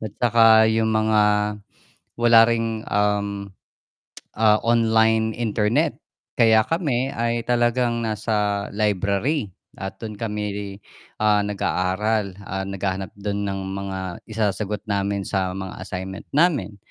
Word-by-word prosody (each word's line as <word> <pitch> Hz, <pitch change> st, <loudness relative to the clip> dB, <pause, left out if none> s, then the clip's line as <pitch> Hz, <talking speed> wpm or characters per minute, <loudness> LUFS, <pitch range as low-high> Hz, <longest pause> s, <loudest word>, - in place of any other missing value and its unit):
At 110 Hz, -2 st, -6 dB
saka 115 Hz, -2 st, +5 dB
yung 110 Hz, 0 st, +2 dB
mga, 110 Hz, -1 st, +2 dB, 1.0 s
wala 120 Hz, -1 st, +6 dB
ring 115 Hz, -1 st, -1 dB
um, 100 Hz, -1 st, -1 dB, 0.8 s
ah, 110 Hz, -1 st, +4 dB
online 110 Hz, -1 st, +2 dB
internet. 110 Hz, -1 st, 0 dB, 0.4 s
Kaya 110 Hz, -1 st, +5 dB
kami 140 Hz, -7 st, 0 dB
ay 115 Hz, -2 st, -1 dB
talagang 120 Hz, -1 st, +1 dB
nasa 105 Hz, -1 st, -1 dB
library 105 Hz, -, 0 dB, 0.3 s
at 95 Hz, 0 st, -5 dB
dun 110 Hz, -2 st, -7 dB
kami, 105 Hz, -2 st, -4 dB, 0.4 s
ah, 105 Hz, -1 st, +3 dB
nag 105 Hz, 0 st, -3 dB
aaral, 100 Hz, +2 st, 0 dB
ah, 95 Hz, 0 st, -4 dB
naghahanap 95 Hz, -1 st, -3 dB
dun 100 Hz, 0 st, -3 dB
ng 95 Hz, 0 st, -3 dB, 0.2 s
mga 95 Hz, -1 st, -5 dB, 0.3 s
isasagot 105 Hz, -1 st, -2 dB
namin 100 Hz, -1 st, -1 dB
sa 95 Hz, -1 st, -2 dB
mga 95 Hz, 0 st, -6 dB
assignment 95 Hz, +2 st, -7 dB
namin. 145 Hz, -, +2 dB
105 Hz, 115 wpm, -22 LUFS, 100-115 Hz, 1.0 s, wala